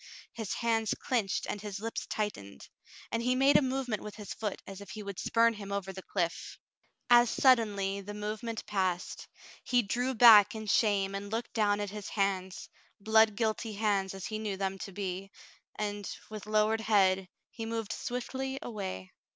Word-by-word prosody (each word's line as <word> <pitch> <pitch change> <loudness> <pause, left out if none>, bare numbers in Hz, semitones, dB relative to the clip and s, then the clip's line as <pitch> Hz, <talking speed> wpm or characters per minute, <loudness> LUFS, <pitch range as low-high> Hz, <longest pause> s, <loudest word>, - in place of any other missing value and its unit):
His 225 -4 -4
hands 225 -2 +1
clinched 225 -7 -1
and 205 - -4
his 205 -2 -5
lips 225 +2 -4
tightened, 100 - -4 0.4
and 230 - 0
he 250 +2 +1
made 270 +2 +4
a - - +7
movement 260 -4 -1
with 210 - -8
his 210 -3 -7
foot 210 -3 -4
as 195 0 -9
if 200 - -11
he 215 - -7
would 200 -2 -6
spurn 230 0 +3
him 200 -2 -8
over 195 -1 -3
the 190 - -7
cliff. 170 -3 -3 0.5
As 240 -1 +7
suddenly 205 -7 +3
the 205 +1 -8
moment 215 +2 -4
passed; 185 -3 -2 0.4
he 245 -1 +2
drew 245 +6 -1
back 220 -3 +8
in 220 0 -5
shame 200 -2 +2
and 200 +1 -5
looked 230 +2 -3
down 205 -2 +2
at 205 -1 -3
his 210 -1 -6
hands, 190 -2 -1 0.3
blood 220 +1 +4
guilty 220 0 -1
hands 200 -2 0
as 195 - -6
he 215 -1 -4
knew 210 -3 -3
them 195 0 -2
to 195 - -6
be, 195 0 -4 0.5
and, 205 -1 -3 0.2
with 210 -1 -7
lowered 215 +1 +2
head, 190 -3 +3 0.2
he 225 -1 -6
moved 225 -1 -3
swiftly 265 +2 -4
away. 190 - -6
210 Hz, 175 wpm, -31 LUFS, 195-225 Hz, 0.5 s, back